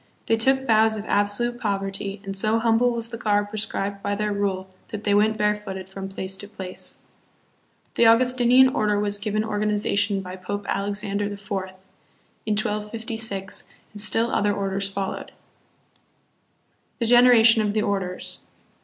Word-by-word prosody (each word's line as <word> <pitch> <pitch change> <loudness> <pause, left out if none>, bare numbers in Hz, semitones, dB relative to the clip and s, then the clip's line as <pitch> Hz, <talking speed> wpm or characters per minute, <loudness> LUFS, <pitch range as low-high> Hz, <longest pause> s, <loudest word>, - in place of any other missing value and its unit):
They 225 - +3
took 265 +4 +3
vows 220 -2 +4
of 210 -1 -6
absolute 220 +5 +1
poverty, 195 -1 -3
and 195 0 -5
so 215 +3 +2
humble 230 +1 +3
was 230 -1 -3
the 230 -1 -7
garb 205 -3 +1
prescribed 205 -2 -3
by 205 0 -1
their 210 0 -1
rule 195 -2 -2 0.2
that 215 -1 -7
they 205 - +1
went 215 +1 +3
barefooted 210 -3 -2
from 195 0 -7
place 190 0 -5
to 205 - -5
place. 190 -3 -5 1.0
The 235 - +4
August 250 +3 +4
inian 255 +2 +5
Order 210 -5 +1
was 205 0 -1
given 215 +1 -1
organization 205 -1 0
by 185 0 -8
Pope 205 +2 -5
Alexander 200 0 -2
IV., 205 0 -4 1.1
in 215 - +2
1256, 215 -2 -3 0.3
and 205 - -2
still 225 +2 +4
other 205 0 +1
orders 195 0 -2
followed. 195 -1 -5 1.6
The 235 - -1
Degeneration 235 -2 +6
of 210 -1 0
the 215 - +2
Orders. 190 -3 -3
210 Hz, 150 wpm, -24 LUFS, 200-225 Hz, 1.6 s, Degeneration